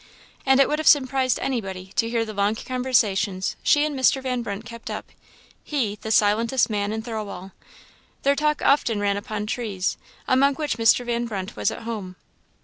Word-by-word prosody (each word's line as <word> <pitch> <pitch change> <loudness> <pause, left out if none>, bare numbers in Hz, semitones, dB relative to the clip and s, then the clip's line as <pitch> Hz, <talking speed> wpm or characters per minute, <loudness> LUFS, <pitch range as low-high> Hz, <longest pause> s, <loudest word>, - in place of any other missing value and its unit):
And 265 0 +5
it 275 - +6
would 300 - -1
have 310 - -2
surprised 260 -2 +4
anybody 190 -8 -4
to 230 - +2
hear 230 -1 0
the 215 - -7
long 205 +1 +1
conversations 220 -7 0
she 295 0 +4
and 300 -2 -3
Mr. 265 0 +3
Van 255 -2 -2
Brunt 205 -1 -5
kept 230 0 -9
up - - -6 0.5
he, 245 -9 -1
the 220 - -5
silentest 225 +4 +3
man 205 0 -1
in 220 0 -3
Thirlwall! 210 -5 -6 0.7
Their 280 +1 +3
talk 300 +1 0
often 235 -6 +3
ran 200 -1 +1
upon 210 0 -4
trees, 210 -5 -2 0.3
among 275 +1 +3
which 295 -5 -2
Mr. 230 +2 +4
Van 240 0 -1
Brunt 195 -2 -5
was - - +1
at - - -7
home. 210 -5 -5
230 Hz, 180 wpm, -24 LUFS, 205-260 Hz, 0.7 s, it